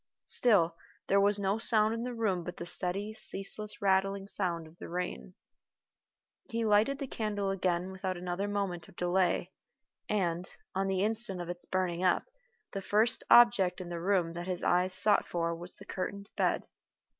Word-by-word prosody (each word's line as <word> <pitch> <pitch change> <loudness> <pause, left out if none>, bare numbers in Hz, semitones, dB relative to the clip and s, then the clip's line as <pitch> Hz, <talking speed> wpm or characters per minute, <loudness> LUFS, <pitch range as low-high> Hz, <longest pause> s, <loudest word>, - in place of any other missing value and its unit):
Still 185 -9 +3 0.3
there 200 0 +3
was 205 +1 +3
no 200 +2 0
sound 220 -1 +4
in 230 - -3
the 245 0 -4
room 200 -6 0
but 180 - -7
the 170 - -6
steady, 195 +5 -1
ceaseless 210 0 -2
rattling 195 0 +1
sound 175 -5 0
of 160 +2 -17
the - - -8
rain. 165 - -4 1.1
He 230 0 -1
lighted 215 +6 +3
the 280 - -4
candle 205 -5 -2
again 185 -1 -1
without 185 -1 -4
another 180 +3 -3
moment 195 -5 -3
of - - -18
delay, 180 0 +1 0.6
and, 180 -3 -1 0.2
on 195 0 0
the 190 0 0
instant 220 -3 -2
of 175 -1 -5
its 175 0 -6
burning 180 -2 -1
up, 180 - +3 0.5
the 195 - -4
first 220 +5 +2
object 220 -7 +6
in 180 -2 -7
the 170 -1 -5
room 180 -3 +1
that 175 +1 -6
his 180 -2 -2
eyes 180 +1 +2
sought 210 - +4
for 170 -1 -1
was 175 +2 -4
the - - -14
curtained 200 +2 -5
bed. - - +1
190 Hz, 175 wpm, -31 LUFS, 175-205 Hz, 1.1 s, object